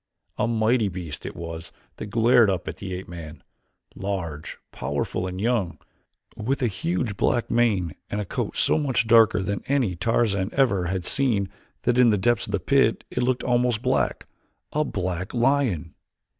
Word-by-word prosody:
A - - +2
mighty 115 -1 +2
beast 90 -4 -6
it - - -7
was 80 0 -7 0.3
that - - -6
glared 115 +1 +4
up 95 -2 -2
at - - -5
the 95 -2 -6
ape 90 - -7
man 85 -2 -9 0.5
large, 85 -6 -4
powerful 70 +5 -2
and 90 0 -5
young, 110 -5 0 0.6
with 130 +5 -1
a - - +4
huge 100 +1 -2
black 120 +3 0
mane 105 -9 +2 0.2
and 105 - -2
a 105 - -2
coat - - -3
so - - +3
much 130 -6 +1
darker 110 -3 +5
than 100 0 -2
any 130 -10 +1
Tarzan 100 0 +1
ever 110 -10 +2
had 90 -1 -2
seen 110 -8 +1 0.3
that 120 +1 +2
in 125 -2 +7
the 105 - +3
depths 120 +3 +1
of - - -6
the - - 0
pit 135 -5 +2
it 125 - -1
looked 125 0 0
almost 120 -2 +1
black - - 0 0.5
a 150 - +2
black 95 - -3
lion! 120 - +1
105 Hz, 170 wpm, -25 LUFS, 90-120 Hz, 0.6 s, in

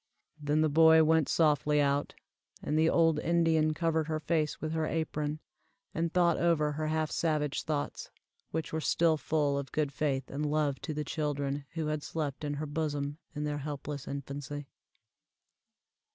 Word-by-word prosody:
Then 150 +1 +1
the 155 - +4
boy 160 +1 +6
went 160 -1 +3
softly 150 -2 +3
out, 140 0 +1 0.5
and 150 - -1
the 160 +1 +4
old 165 -2 +3
Indian 160 -2 +2
covered 160 -1 0
her 155 -1 -1
face 155 -1 0
with 155 - -3
her 160 -1 0
apron, 155 -2 -2 0.5
and 165 0 -1
thought 175 -2 +3
over 160 -3 +2
her 155 +1 -2
half 155 0 0
savage 150 -3 0
thoughts, 150 -2 -3 0.4
which 160 0 -4
were 160 - -1
still 165 +1 +3
full 145 -2 0
of 140 - -7
good 150 -2 0
faith 135 -2 -2
and 145 +2 -3
love 145 -3 0
to 155 - -4
the 150 - -2
children 145 -2 -2
who 165 -2 -2
had 155 0 -1
slept 150 -2 -4
in 145 -1 -2
her 150 +2 -3
bosom 145 -1 -3 0.2
in 150 - -3
their 150 -1 -2
helpless 145 -1 -5
infancy. 140 +1 -5
150 Hz, 165 wpm, -30 LUFS, 145-160 Hz, 0.5 s, boy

